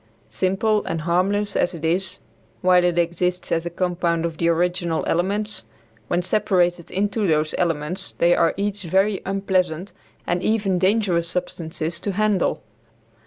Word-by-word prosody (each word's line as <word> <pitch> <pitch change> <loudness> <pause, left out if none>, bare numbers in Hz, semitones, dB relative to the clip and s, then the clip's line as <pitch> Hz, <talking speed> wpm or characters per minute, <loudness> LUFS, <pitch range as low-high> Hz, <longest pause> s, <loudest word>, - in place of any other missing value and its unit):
Simple 205 +3 +1
and 165 -1 -2
harmless 195 +5 +1
as 175 - +1
it 165 -1 -5
is, 180 +3 0 0.4
while 180 -1 +5
it 175 -1 +1
exists 175 +1 0
as 165 +1 0
a - - -2
compound 170 -1 -1
of 165 -2 -4
the 170 - +2
original 175 0 0
elements, 200 - -1 0.4
when 175 +1 0
separated 180 -4 +1
into 205 +2 0
those 155 -1 +1
elements 170 +2 -2
they 175 +1 +4
are 165 - +2
each 205 0 -2
very 190 +3 +1
unpleasant 190 -2 -1 0.3
and 175 0 0
even 200 -3 +1
dangerous 185 -3 +2
substances 170 -2 -1
to 200 - -3
handle. 210 -1 +1
180 Hz, 145 wpm, -22 LUFS, 170-195 Hz, 0.4 s, while